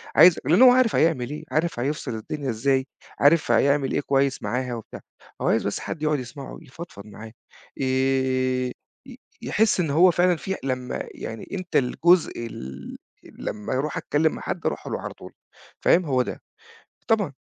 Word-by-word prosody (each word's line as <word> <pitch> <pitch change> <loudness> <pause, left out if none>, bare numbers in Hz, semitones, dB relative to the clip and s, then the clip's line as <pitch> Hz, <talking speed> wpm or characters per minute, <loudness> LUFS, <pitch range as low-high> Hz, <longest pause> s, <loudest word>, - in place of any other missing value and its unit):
عايزك 175 -2 +7
لإن 170 - +4
هو 255 -1 +10
عارف 250 -3 +3
هيعمل 140 -6 +2
إيه 150 - -6
عارف 155 -4 0
هيفصل 135 -3 -2
الدنيا 135 +5 -5
إزاي، 130 +3 +1 0.3
عارف 150 +3 +4
هيعمل 140 -1 +3
إيه - - +1
كويس 135 -1 0
معاها 125 -1 -2
وبتاع، 115 - -9 0.4
هو - - 0
عايز - - +2
بس - - -2
حد 155 - -6
يقعد 150 -1 +1
يسمعه 135 +3 -8
يفضفض 130 -8 -11
معاه، 110 +1 -11 0.5
ي 130 -1 +1 0.7
يحس 215 -3 +1
إن 160 -4 +1
هو 175 +5 +5
فعلًا 180 +1 +3
في 190 +4 -4
لمّا 130 -2 -3
يعني 115 - -7
أنت 185 -2 -6
الجزء 170 +7 +3 0.2
ال 65 - -8 0.3
لمّا 105 +4 -6
اروح 140 +3 -2
أتكلّم 155 +2 +1
مع - - -8
حد - - -5
اروح - - -2
له - - -3
على - - -6
طول - - -13 0.5
فاهم، 175 0 +4
هو 130 -3 +2
ده، - - -5 0.7
طبعًا، 205 -9 +2
140 Hz, 165 wpm, -24 LUFS, 130-165 Hz, 0.7 s, هو